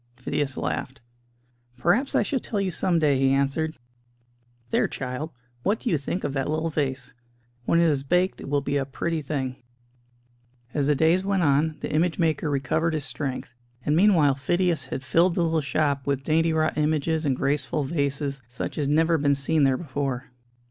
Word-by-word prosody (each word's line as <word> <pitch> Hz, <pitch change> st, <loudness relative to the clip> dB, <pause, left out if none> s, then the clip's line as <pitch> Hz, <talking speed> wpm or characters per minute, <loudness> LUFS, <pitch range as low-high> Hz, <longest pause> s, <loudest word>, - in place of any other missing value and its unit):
Phidias 135 Hz, +2 st, -2 dB
laughed. 135 Hz, +1 st, -3 dB, 0.8 s
"Perhaps 205 Hz, -, +1 dB
I -, -, +4 dB
shall 275 Hz, -, -1 dB
tell 215 Hz, -3 st, -3 dB
you 195 Hz, -2 st, 0 dB
some 175 Hz, 0 st, +1 dB
day," 145 Hz, -4 st, +3 dB
he 135 Hz, 0 st, +3 dB
answered. 140 Hz, +4 st, 0 dB, 0.9 s
"There, -, -, +3 dB
child, 130 Hz, +4 st, -4 dB, 0.3 s
what 205 Hz, -, +1 dB
do 245 Hz, -, -1 dB
you 160 Hz, -, +3 dB
think 160 Hz, +6 st, -3 dB
of -, -, -2 dB
that 135 Hz, 0 st, -1 dB
little 160 Hz, +1 st, -1 dB
vase? 135 Hz, -3 st, -2 dB, 0.5 s
When 170 Hz, -, +3 dB
it -, -, +5 dB
is 145 Hz, -4 st, +2 dB
baked 180 Hz, +7 st, +1 dB
it -, -, -7 dB
will 145 Hz, 0 st, +1 dB
be 140 Hz, +1 st, -1 dB
a 140 Hz, -, +1 dB
pretty 160 Hz, +4 st, -2 dB
thing." 135 Hz, -3 st, -3 dB, 1.2 s
As 145 Hz, -2 st, 0 dB
the 150 Hz, -, +3 dB
days 160 Hz, +6 st, +3 dB
went 195 Hz, -2 st, +1 dB
on, 150 Hz, +2 st, +2 dB
the -, -, -4 dB
image 160 Hz, +2 st, +1 dB
maker 160 Hz, -3 st, +1 dB
recovered 155 Hz, +4 st, 0 dB
his 150 Hz, -2 st, -2 dB
strength; 135 Hz, -1 st, -4 dB, 0.3 s
and 150 Hz, -, +2 dB
meanwhile 170 Hz, -6 st, +5 dB
Phidias 170 Hz, +3 st, 0 dB
had 130 Hz, -, -5 dB
filled 170 Hz, +6 st, +3 dB
the 175 Hz, -, +2 dB
little 165 Hz, -1 st, +1 dB
shop 140 Hz, -1 st, 0 dB
with 140 Hz, -1 st, 0 dB
dainty 165 Hz, +2 st, +2 dB
wrought 155 Hz, -1 st, +1 dB
images 155 Hz, +1 st, +1 dB
and 140 Hz, -4 st, +1 dB
graceful 140 Hz, +1 st, 0 dB
vases, 140 Hz, -1 st, -2 dB
such 120 Hz, +5 st, -5 dB
as 145 Hz, -, 0 dB
had 145 Hz, -, +2 dB
never 165 Hz, 0 st, +3 dB
been 140 Hz, 0 st, +3 dB
seen 140 Hz, +2 st, +2 dB
there 135 Hz, -1 st, +3 dB
before. 135 Hz, -4 st, -4 dB
150 Hz, 190 wpm, -25 LUFS, 135-165 Hz, 1.2 s, it